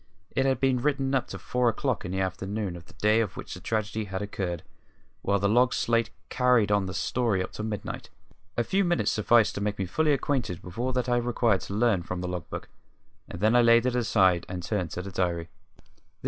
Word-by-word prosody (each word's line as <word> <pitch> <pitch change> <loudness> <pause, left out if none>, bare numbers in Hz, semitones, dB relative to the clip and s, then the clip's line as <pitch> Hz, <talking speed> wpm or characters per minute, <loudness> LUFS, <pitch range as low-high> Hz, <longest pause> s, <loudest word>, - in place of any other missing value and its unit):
It 135 0 +1
had 135 - +1
been 130 -2 +2
written 135 -1 0
up 130 -2 +1
to - - -6
four 125 -1 +1
o'clock 130 +1 -1
in 90 - -4
the 95 0 -1
afternoon 95 +1 -3
of 85 0 -11
the - - -17
day 110 +2 +3
on 110 - +1
which - - -7
the - - -7
tragedy 110 -1 -2
had 95 -1 -4
occurred, 95 -4 -3 0.6
while 100 - +1
the 100 +1 +1
log 125 +4 +3
slate 115 -1 +1 0.2
carried 125 -5 +3
on 100 -2 +2
the 95 - -5
story 100 0 0
up - - -7
to 105 - -6
midnight. 110 -2 -5 0.5
A 120 - +3
few 195 - +1
minutes 175 -1 +1
sufficed 110 +1 +4
to 100 - -4
make 105 0 -1
me 95 - -1
fully 150 - +1
acquainted 130 - -1
with 90 +5 -9
all 130 +2 0
that 125 0 0
I 120 0 +2
required 120 -4 +1
to 100 - -5
learn 110 -4 +3
from 90 +1 -5
the 90 - -3
log 90 -2 -5
book, - - -6 0.6
and - - -7
I 110 - +6
then 120 0 +5
laid 115 +1 +6
it 125 -1 +1
aside 95 -7 +3
and 90 -1 -5
turned 90 -2 -1
to 90 - -5
the 100 - -7
diary. 85 -2 -1
110 Hz, 230 wpm, -27 LUFS, 95-125 Hz, 0.6 s, I